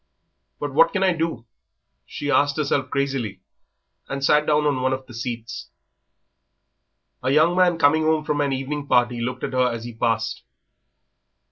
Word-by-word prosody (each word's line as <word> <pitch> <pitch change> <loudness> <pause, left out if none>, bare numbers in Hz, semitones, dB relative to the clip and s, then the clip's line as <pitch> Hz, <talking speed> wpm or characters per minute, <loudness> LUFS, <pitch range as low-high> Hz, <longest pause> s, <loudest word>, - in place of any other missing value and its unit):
"But 145 -2 -4
what 165 +4 +4
can 190 - +1
I 185 -1 +3
do?" 165 -8 -3 0.6
she 145 0 -4
asked 145 +2 +2
herself 140 -3 0
crazily, 135 -9 -2 0.7
and 140 0 -2
sat 150 +1 +3
down 150 0 +2
on 140 -3 +1
one 130 +1 +1
of 130 0 -5
the 120 - -13
seats. 115 0 -6 1.5
A 130 - -1
young 155 +5 +4
man 180 -2 +3
coming 155 0 +4
home 155 -1 +2
from 150 -1 -1
an 140 -1 0
evening 140 +2 -3
party 120 -2 +2
looked 125 +2 -4
at - - -3
her 125 -1 +2
as 115 -1 -5
he 120 0 -7
passed. 115 0 -1
140 Hz, 165 wpm, -23 LUFS, 125-150 Hz, 1.5 s, what